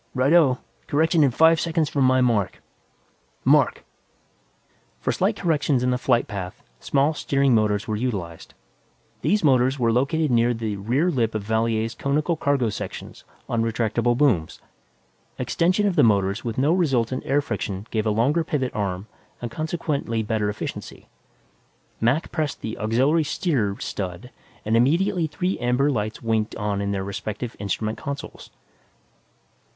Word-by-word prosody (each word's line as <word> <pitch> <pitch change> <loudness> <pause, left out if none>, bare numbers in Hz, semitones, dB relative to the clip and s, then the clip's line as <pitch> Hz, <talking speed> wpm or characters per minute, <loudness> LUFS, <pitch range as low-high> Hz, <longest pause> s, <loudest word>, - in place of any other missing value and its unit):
"Right 130 +4 +2
o. 145 -7 +5 0.3
Correction 160 +2 +3
in 140 - +4
five 160 +6 +4
seconds 165 -2 0
from 140 -2 +1
my 130 0 +4
mark 115 -6 +1 0.9
mark!" - - +3 1.1
For - - -1
slight - - +1
corrections 150 -6 +1
in 125 - +2
the 125 - +1
flight 120 -2 +2
path, 95 -4 -6 0.2
small 140 +3 +1
steering 140 -3 +1
motors 105 -1 +1
were 110 - -1
utilized. 100 -8 -4 0.7
These 205 +6 +1
motors 130 -2 +3
were 115 -3 +2
located 140 +5 +1
near 120 0 +3
the 110 -3 -3
rear 130 - +1
lip 115 -6 0
of 105 - -2
Valier's 110 +1 0
conical 145 +7 0
cargo 140 -6 +1
section - - -6 0.3
on 115 - 0
retractable 115 +1 0
booms. 120 - +1 0.8
Extension 185 +5 +1
of 195 -3 +1
the 155 - +5
motors 100 -2 +2
with 115 -2 -4
no 145 +5 +3
resultant 130 -8 +1
air 140 - +2
friction 100 -9 -4
gave 110 -1 0
a - - +3
longer 130 +10 +2
pivot 135 -5 -2
arm 95 -2 -3 0.3
and 120 -1 -5
consequently 150 -8 -2
better 105 -1 -1
efficiency. 105 - -7 0.9
Mac 125 +8 +1
pressed 155 -4 -2
the 110 - -4
"Aux. 130 +9 +2
Steer" 140 - -1
stud 95 +4 -5 0.3
and 110 +2 +1
immediately 165 - +2
three 180 +5 -2
amber 125 +4 +2
lights 110 -3 -3
winked 110 -1 0
on 105 -2 -2
in 100 - -2
their 95 -1 -2
respective 105 +4 -5
instrument 110 +2 -3
consoles. 140 0 -7
125 Hz, 150 wpm, -23 LUFS, 110-145 Hz, 1.1 s, o